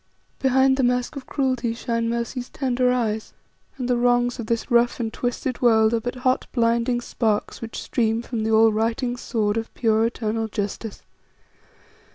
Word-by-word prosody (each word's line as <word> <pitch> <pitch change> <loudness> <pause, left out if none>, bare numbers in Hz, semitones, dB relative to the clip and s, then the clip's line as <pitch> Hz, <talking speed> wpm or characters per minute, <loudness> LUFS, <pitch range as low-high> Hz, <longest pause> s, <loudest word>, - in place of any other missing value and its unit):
Behind 265 0 +3
the 270 - +1
mask 250 +2 0
of 275 - -8
cruelty 255 -4 -1
shine 230 -1 -1
Mercy's 235 +2 -3
tender 255 -2 +1
eyes; 220 -3 -1 0.4
and 250 -2 -3
the 250 -1 +2
wrongs 245 0 +2
of 225 - -5
this 230 +3 -2
rough 240 +1 +3
and 225 -2 -2
twisted 245 +1 -3
world 220 -2 +4
are 230 - +2
but 245 +2 -4
hot, 255 0 +2
blinding 235 0 +2
sparks 220 -3 -1
which 230 -1 -6
stream 225 -1 0
from 235 -2 -4
the 220 - -1
all 220 0 +5
righting 230 +3 0
sword 220 -3 -1
of 225 0 -4
pure, 220 -1 +2
eternal 225 -1 -2
Justice. 205 +1 -5
235 Hz, 170 wpm, -23 LUFS, 225-250 Hz, 0.4 s, all